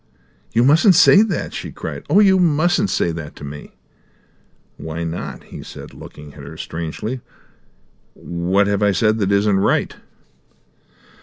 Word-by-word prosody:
"You 115 Hz, -, +2 dB
mustn't 165 Hz, -, +5 dB
say 200 Hz, -, +7 dB
that!" 220 Hz, -2 st, -2 dB
she -, -, -6 dB
cried. -, -, -7 dB
"Oh, -, -, +5 dB
you 190 Hz, -2 st, +4 dB
mustn't 175 Hz, +4 st, +2 dB
say 85 Hz, -, 0 dB
that 80 Hz, -2 st, -7 dB
to -, -, -12 dB
me!" 75 Hz, +1 st, -9 dB, 1.0 s
"Why 80 Hz, +1 st, -5 dB
not?" 85 Hz, +1 st, -6 dB
he -, -, -10 dB
said, -, -, -11 dB
looking 75 Hz, -1 st, -12 dB
at 75 Hz, -, -12 dB
her 70 Hz, -, -10 dB
strangely. 85 Hz, +10 st, -5 dB, 0.9 s
"What 90 Hz, +4 st, 0 dB
have 100 Hz, 0 st, -1 dB
I 100 Hz, -1 st, +3 dB
said 110 Hz, +1 st, +1 dB
that 100 Hz, -1 st, 0 dB
isn't 100 Hz, 0 st, +2 dB
right?" 95 Hz, -, 0 dB
100 Hz, 150 wpm, -19 LUFS, -, 1.0 s, say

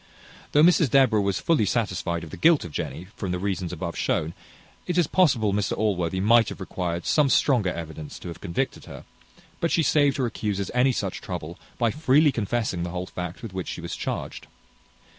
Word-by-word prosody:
Though 150 Hz, -, +6 dB
Mrs 170 Hz, -4 st, +5 dB
Deborah 120 Hz, -4 st, +4 dB
was 100 Hz, -1 st, 0 dB
fully 150 Hz, -11 st, +2 dB
satisfied 90 Hz, -6 st, -1 dB
of 80 Hz, -, -9 dB
the -, -, -6 dB
guilt 165 Hz, -, +4 dB
of 85 Hz, -, -8 dB
Jenny, 85 Hz, +4 st, -5 dB
from 95 Hz, -3 st, -4 dB
the 90 Hz, -, -1 dB
reasons 95 Hz, -2 st, -2 dB
above 85 Hz, 0 st, -5 dB
shewn, 80 Hz, +2 st, -1 dB, 0.5 s
it 180 Hz, -, -1 dB
is 175 Hz, -, +4 dB
possible 130 Hz, -, +2 dB
Mr 100 Hz, -1 st, -1 dB
Allworthy 95 Hz, -4 st, 0 dB
might 110 Hz, +3 st, +4 dB
have -, -, -8 dB
required 90 Hz, -2 st, -4 dB
some 150 Hz, -3 st, +3 dB
stronger 120 Hz, -10 st, +3 dB
evidence 80 Hz, -3 st, -7 dB
to -, -, -10 dB
have 85 Hz, -, -9 dB
convicted 85 Hz, -3 st, -3 dB
her; -, -, -10 dB, 0.5 s
but 170 Hz, -, 0 dB
she 165 Hz, -, +2 dB
saved 145 Hz, -2 st, +3 dB
her 130 Hz, -, +1 dB
accusers 105 Hz, -4 st, -3 dB
any 125 Hz, +2 st, +4 dB
such 100 Hz, -6 st, -3 dB
trouble, 85 Hz, -2 st, -6 dB, 0.2 s
by 115 Hz, -2 st, +2 dB
freely 150 Hz, +1 st, +4 dB
confessing 110 Hz, -5 st, -2 dB
the 85 Hz, -, -3 dB
whole 90 Hz, +1 st, -4 dB
fact 90 Hz, +2 st, -7 dB
with 110 Hz, -5 st, -7 dB
which 95 Hz, -1 st, -4 dB
she -, -, -5 dB
was 85 Hz, 0 st, -5 dB
charged. -, -, -5 dB
100 Hz, 200 wpm, -25 LUFS, 90-130 Hz, 0.5 s, Though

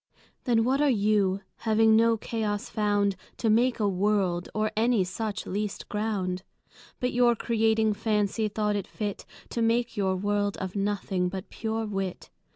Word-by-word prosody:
Then 235 Hz, -3 st, +3 dB
what 265 Hz, +4 st, +2 dB
are 295 Hz, -, +4 dB
You, 205 Hz, -4 st, +2 dB, 0.2 s
having 220 Hz, 0 st, +4 dB
no 230 Hz, 0 st, +4 dB
Chaos 210 Hz, -2 st, -3 dB
found 205 Hz, -2 st, +1 dB, 0.2 s
To 225 Hz, -, +1 dB
make 240 Hz, +3 st, +3 dB
a 210 Hz, -, +2 dB
World, 190 Hz, -2 st, +1 dB
or 215 Hz, 0 st, 0 dB
any 225 Hz, -2 st, +3 dB
such 200 Hz, +3 st, -4 dB
least 205 Hz, +1 st, -3 dB
ground? 200 Hz, -4 st, -2 dB, 0.6 s
But 250 Hz, 0 st, -1 dB
your 240 Hz, -1 st, +4 dB
Creating 220 Hz, -1 st, +2 dB
Fancy, 210 Hz, 0 st, 0 dB
thought 210 Hz, 0 st, -1 dB
it 200 Hz, -, -3 dB
fit 205 Hz, -3 st, -5 dB, 0.2 s
To 235 Hz, -, -2 dB
make 235 Hz, +1 st, +1 dB
your 190 Hz, -3 st, +1 dB
World 205 Hz, +1 st, 0 dB
of 190 Hz, 0 st, -5 dB
Nothing, 195 Hz, -2 st, -1 dB
but 190 Hz, 0 st, -7 dB
pure 225 Hz, 0 st, -2 dB
Wit. 195 Hz, -3 st, -4 dB
210 Hz, 160 wpm, -27 LUFS, 200-225 Hz, 0.6 s, are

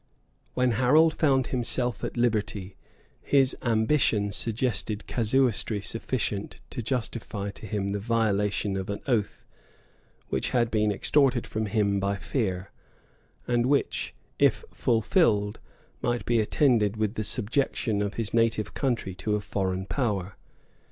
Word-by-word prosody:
] -, -, -40 dB
When 125 Hz, -1 st, +2 dB
Harold 145 Hz, +7 st, +4 dB
found 135 Hz, -5 st, +2 dB
himself 125 Hz, 0 st, 0 dB
at -, -, -4 dB
liberty, 105 Hz, -5 st, -1 dB, 0.5 s
his 135 Hz, -2 st, +3 dB
ambition 110 Hz, -3 st, +2 dB
suggested 110 Hz, -1 st, -1 dB
casuistry 115 Hz, -2 st, +1 dB
sufficient 105 Hz, -1 st, -2 dB
to -, -, -4 dB
justify 110 Hz, -4 st, -3 dB
to 110 Hz, -, -10 dB
him 100 Hz, 0 st, -2 dB
the 100 Hz, +1 st, -2 dB
violation 105 Hz, -2 st, 0 dB
of 95 Hz, 0 st, -4 dB
an 100 Hz, -, -3 dB
oath, 115 Hz, -7 st, -1 dB, 0.8 s
which -, -, -1 dB
had 120 Hz, -2 st, +1 dB
been 105 Hz, -1 st, +2 dB
extorted 130 Hz, +3 st, +2 dB
from 110 Hz, 0 st, -3 dB
him 100 Hz, -1 st, +1 dB
by 100 Hz, +1 st, 0 dB
fear, 100 Hz, -4 st, -2 dB, 0.8 s
and 120 Hz, 0 st, +2 dB
which, 140 Hz, +1 st, 0 dB, 0.2 s
if -, -, +3 dB
fulfilled, 110 Hz, -, +2 dB, 0.4 s
might 120 Hz, 0 st, -1 dB
be 120 Hz, -1 st, +2 dB
attended 110 Hz, -2 st, +2 dB
with 110 Hz, -1 st, 0 dB
the 110 Hz, -, -3 dB
subjection 110 Hz, -1 st, 0 dB
of 100 Hz, 0 st, -2 dB
his 115 Hz, -3 st, -3 dB
native 115 Hz, -2 st, +1 dB
country 120 Hz, -8 st, -1 dB
to 100 Hz, +3 st, -2 dB
a -, -, 0 dB
foreign 95 Hz, -2 st, -2 dB
power. 100 Hz, -3 st, -2 dB
110 Hz, 135 wpm, -27 LUFS, 100-120 Hz, 0.8 s, Harold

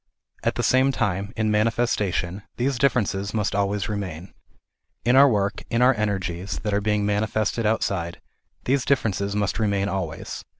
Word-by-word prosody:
At -, -, 0 dB
the -, -, -1 dB
same 130 Hz, +1 st, +4 dB
time, 100 Hz, -4 st, -1 dB
in 110 Hz, -1 st, +1 dB
manifestation, 105 Hz, -4 st, 0 dB, 0.2 s
these 130 Hz, 0 st, 0 dB
differences 105 Hz, -6 st, +1 dB
must 105 Hz, -2 st, 0 dB
always 100 Hz, 0 st, 0 dB
remain. 95 Hz, -5 st, -5 dB, 0.7 s
In 120 Hz, +2 st, +4 dB
our 140 Hz, +1 st, +8 dB
work, 100 Hz, -3 st, 0 dB
in 115 Hz, +1 st, +2 dB
our 130 Hz, +1 st, +6 dB
energies 95 Hz, -4 st, -2 dB
that 105 Hz, -1 st, -1 dB
are 100 Hz, -, +2 dB
being 105 Hz, 0 st, +1 dB
manifested 110 Hz, +2 st, 0 dB
outside, 95 Hz, -6 st, -1 dB, 0.4 s
these 135 Hz, +1 st, +1 dB
differences 100 Hz, -7 st, 0 dB
must 105 Hz, 0 st, -1 dB
remain 100 Hz, -2 st, +1 dB
always. 90 Hz, -4 st, -4 dB
105 Hz, 155 wpm, -24 LUFS, 100-115 Hz, 0.7 s, our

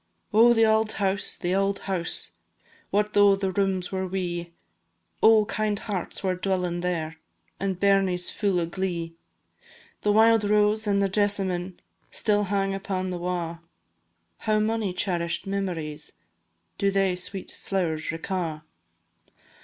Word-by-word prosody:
Oh, 230 Hz, +3 st, +7 dB
the 225 Hz, -1 st, +5 dB
auld 220 Hz, 0 st, +2 dB
house, 195 Hz, -1 st, 0 dB
the 175 Hz, +1 st, -1 dB
auld 195 Hz, +1 st, +1 dB
house! 185 Hz, -3 st, -1 dB, 0.6 s
What 210 Hz, +1 st, 0 dB
though 205 Hz, -1 st, +6 dB
the 195 Hz, -1 st, -2 dB
rooms 190 Hz, -1 st, 0 dB
were 190 Hz, -1 st, -2 dB
wee? 175 Hz, -2 st, -3 dB, 0.7 s
Oh, 220 Hz, -1 st, +6 dB
kind 215 Hz, 0 st, -1 dB
hearts 200 Hz, -3 st, -4 dB
were 190 Hz, -1 st, +1 dB
dwelling 180 Hz, -1 st, -1 dB
there, 165 Hz, -3 st, -2 dB, 0.4 s
And 190 Hz, -2 st, -2 dB
bairnies 195 Hz, -3 st, +2 dB
fu' 200 Hz, -4 st, 0 dB
o' 170 Hz, -, 0 dB
glee! 170 Hz, -1 st, -3 dB, 0.9 s
The 210 Hz, -, +2 dB
wild 225 Hz, +1 st, +5 dB
rose 210 Hz, +1 st, +2 dB
and 200 Hz, -1 st, +2 dB
the -, -, +3 dB
jesamine 190 Hz, -3 st, 0 dB, 0.3 s
Still 210 Hz, -1 st, +1 dB
hang 195 Hz, 0 st, 0 dB
upon 190 Hz, -1 st, -3 dB
the 180 Hz, -, -4 dB
wa'; 170 Hz, -2 st, -3 dB, 0.8 s
How 215 Hz, -1 st, +1 dB
mony 215 Hz, -2 st, 0 dB
cherish'd 175 Hz, -2 st, -1 dB
memories 170 Hz, -6 st, -4 dB, 0.7 s
Do 200 Hz, -, +3 dB
they, 195 Hz, -2 st, +1 dB
sweet 185 Hz, +1 st, -5 dB
flowers, 165 Hz, -5 st, -2 dB
reca'! 165 Hz, -2 st, -3 dB
195 Hz, 135 wpm, -26 LUFS, 180-205 Hz, 0.9 s, Oh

